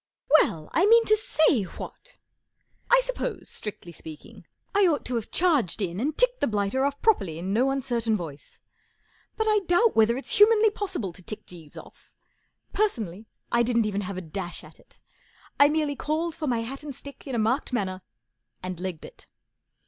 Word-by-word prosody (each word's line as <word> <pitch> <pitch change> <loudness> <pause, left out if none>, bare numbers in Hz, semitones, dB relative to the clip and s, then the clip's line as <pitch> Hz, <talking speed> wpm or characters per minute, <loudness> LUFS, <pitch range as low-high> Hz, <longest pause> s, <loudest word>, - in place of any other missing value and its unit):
'* - - -49
Well, 155 -2 -2
I 365 +5 +4
mean 460 +1 +6
to 430 - +5
say, 315 - +3
what! 350 - -9 0.7
1 - - +5
suppose, - - -4
strictly 200 -4 -6
speaking, 155 -2 -12 0.3
I 400 -1 +5
ought 310 -4 0
to 250 - -3
have 230 -3 -2
charged 300 - +1
in 185 -2 -2
and 295 +6 -1
ticked - - +2
the - - +2
blighter 210 +4 0
off 280 0 -2
properly 195 - +2
in 185 +4 -3
no 250 +5 +3
uncertain 240 -5 0
voice. 155 -6 -9 0.8
But 440 - +1
I 425 -1 +4
doubt 410 +6 +3
whether 225 +2 +4
it's 275 - -1
humanly 435 0 +6
possible 370 - -4
to 185 - -15
tick 215 +4 -7
Jeeves 165 -4 -12
off. - - -14 0.6
Personally, 225 - -1 0.2
I 235 - +3
didn't 235 -1 +2
even 205 -1 -1
have 195 -1 -5
a - - -3
dash 175 +1 -5
at - - -14
it. - - -23 0.6
I 285 0 +7
merely 300 -2 0
called 315 +4 -2
for 310 -1 -4
my 240 -3 +1
hat 265 +5 -6
and 295 -3 -7
stick 280 +2 -11
in 265 - -3
a - - 0
marked 230 +7 0
manner 190 -6 -2 0.6
and 185 -2 -5
legged 180 -4 -5
it. - - -14
245 Hz, 185 wpm, -26 LUFS, -, 0.8 s, I